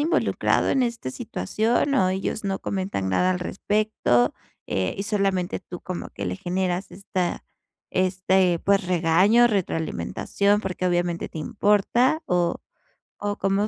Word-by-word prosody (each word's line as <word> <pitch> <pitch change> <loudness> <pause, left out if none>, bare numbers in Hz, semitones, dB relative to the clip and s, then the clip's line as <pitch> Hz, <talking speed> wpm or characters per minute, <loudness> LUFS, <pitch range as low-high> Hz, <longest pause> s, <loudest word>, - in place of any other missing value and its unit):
involucrado 320 +4 +1
en 265 - +2
este 235 - -2
situación 220 - -1
o 190 -9 +3
ellos 190 +3 -2
no 195 -1 -2
comentan 185 - -2
nada 180 - +3
al 180 - -2
respecto, 200 - +1 0.3
eh, 95 -1 -1
y 195 - -2
solamente 195 -4 0
tú 175 -1 -9
como 185 -2 -5
que - - -7
le - - -2
generas 185 0 -2
esta 185 -2 -3 0.5
este, 185 -1 +2
pues, 195 -2 +2
regaño, 185 +7 +4
retroalimentación, 200 - 0
porque 185 -1 -2
obviamente 175 -1 0
te - - -8
importa, 210 - +2
o 175 - +1 0.7
o 205 0 -1
cómo 195 +2 +1
190 Hz, 135 wpm, -24 LUFS, 175-205 Hz, 0.7 s, regaño